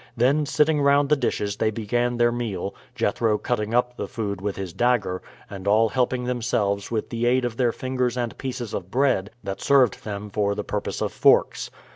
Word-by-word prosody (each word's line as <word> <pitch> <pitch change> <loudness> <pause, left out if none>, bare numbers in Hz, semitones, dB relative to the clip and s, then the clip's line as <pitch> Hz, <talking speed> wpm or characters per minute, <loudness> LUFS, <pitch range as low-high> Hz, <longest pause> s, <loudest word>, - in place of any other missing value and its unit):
Then 140 +5 +3
sitting 150 0 +2
round 140 0 +4
the 150 - +5
dishes 105 -6 -1
they 110 - +2
began 120 +3 -1
their 120 0 +4
meal, 110 -6 -3 0.2
Jethro 110 -2 +1
cutting 105 -1 -2
up 125 0 +1
the - - -3
food 100 -4 -4
with 100 0 -2
his 95 -3 -5
dagger, 120 -7 +1 0.3
and 100 -1 -8
all 110 +2 +4
helping 125 +1 0
themselves 110 -5 -1
with 110 -2 -3
the 120 0 0
aid 125 +1 +3
of 120 -2 -3
their 125 -2 +2
fingers 125 -1 -2
and 120 -2 -2
pieces 125 -4 -4
of 95 -1 -4
bread, 125 -6 +1
that 100 -1 -5
served 130 -6 +3
them 105 -1 -6
for 100 0 0
the - - -3
purpose - - -3
of - - -1
forks. - - +3
120 Hz, 195 wpm, -24 LUFS, 105-125 Hz, 0.3 s, the